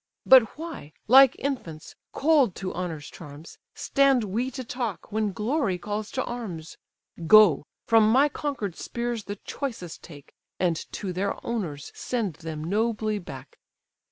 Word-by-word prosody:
But 255 -3 +6
why, 320 - -8
like 265 +2 +8
infants, 175 - -5 0.2
cold 285 - +3
to 190 -1 -5
honour's 165 -4 -5
charms, 150 0 -12 0.2
Stand 275 -4 +2
we 220 +6 -2
to 260 0 -6
talk, 235 -5 -5
when 215 -1 0
glory 220 - -1
calls 210 +3 -4
to 260 - -1
arms? 190 -10 -6 0.5
Go—from 215 +3 +5
my 270 +5 +5
conquer'd 270 - -4
spears 235 -2 -4
the 205 - -5
choicest 215 - -6
take, 145 -4 -14 0.3
And 175 -3 +2 0.2
to 190 -3 -4
their 195 +2 -1
owners 170 -12 -4
send 220 -10 -3
them 160 -2 -6
nobly 215 +3 0
back." 175 - -11
215 Hz, 135 wpm, -26 LUFS, 175-250 Hz, 0.5 s, like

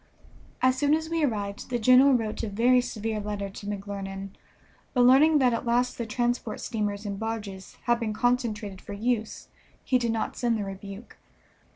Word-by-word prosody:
As 255 0 +3
soon 290 +2 +4
as 320 +1 -4
we 330 -1 +1
arrived 205 -6 -2
the 245 - 0
general 255 +4 +6
wrote 220 -3 -2
a 225 - -3
very 245 +5 +4
severe 220 -2 -3
letter 205 -1 -4
to 205 - -9
McClernand, 195 -1 -5 0.7
but 250 - +4
learning 275 +6 +6
that 255 -4 +3
at 230 - -2
last 245 +2 +1
the 235 - -3
transport 240 0 -1
steamers 210 -2 -3
and 200 -1 -4
barges 215 -4 -5
had 240 0 +2
been 225 -2 -2
concentrated 215 -4 -1
for - - -8
use 220 +1 -2 0.3
he 255 -1 +2
did 235 -2 0
not 225 -1 -2
send 235 -2 0
the 210 - -2
rebuke. 195 +3 -9
225 Hz, 180 wpm, -27 LUFS, 205-250 Hz, 0.7 s, general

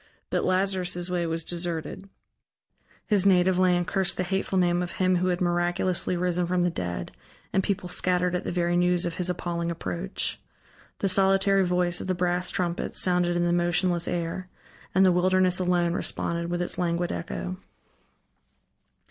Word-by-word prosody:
But - - +1
Lazarus' 185 -1 0
way 175 -2 0
was 165 0 -2
deserted: 175 +3 -4 1.0
his 205 -4 +2
native 185 -1 +4
land 180 -1 +3
cursed 190 0 -1
the 185 - 0
hateful 190 +1 -1
name 175 -1 +2
of 175 -1 -4
him 185 -1 +2
who 180 +1 0
had 180 -1 0
miraculously 175 +1 0
risen 180 0 0
from 180 0 +1
the 175 - +1
dead, 85 - -4 0.4
and 190 - +3
people 195 -2 -2
scattered 180 0 0
at 180 - -1
the - - -3
very 175 0 0
news 180 0 +2
of 170 - -2
his 180 0 -1
appalling 170 -1 -2
approach. 170 +3 -4 0.6
The 195 - 0
solitary 195 +1 +4
voice 180 -1 0
of - - -6
the 185 - 0
brass 180 0 0
trumpets 175 -2 -2
sounded 180 -1 +2
in 175 - +1
the 175 - +2
motionless 175 0 +1
air, 175 +2 -3 0.5
and 190 0 +6
the 185 - +6
wilderness 185 0 +2
alone 175 -2 +1
responded 170 -1 -2
with 175 0 -1
its - - -1
languid 175 0 0
echo. 180 +2 -4
180 Hz, 165 wpm, -26 LUFS, 175-185 Hz, 1.0 s, and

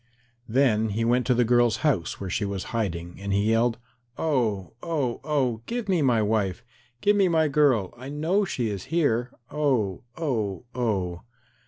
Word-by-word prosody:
Then 110 -3 +3
he 110 +3 -1
went 125 +2 +2
to 125 - +3
the 120 0 +3
girl's 120 -1 +3
house, 125 - 0
where 100 - -4
she 105 - 0
was 100 -2 -3
hiding, 90 -6 -3
and 100 0 -3
he 100 +3 +2
yelled, 115 +1 +2 0.4
"Oh, 110 - 0
oh, 145 -8 -2
oh, 135 -7 0
give 240 -2 -3
me 185 -4 +2
my 120 -6 +3
wife. 105 -4 0 0.4
Give 205 +1 +4
me 195 -2 +4
my 160 -2 +3
girl. 140 - +2
I 130 +3 -9
know 160 +8 +1
she 125 - -2
is 100 -3 -4
here. 125 -8 +1 0.2
Oh, 130 -11 0 0.2
oh, 115 - -2
oh." 95 -8 -1
120 Hz, 170 wpm, -26 LUFS, 105-145 Hz, 0.4 s, Give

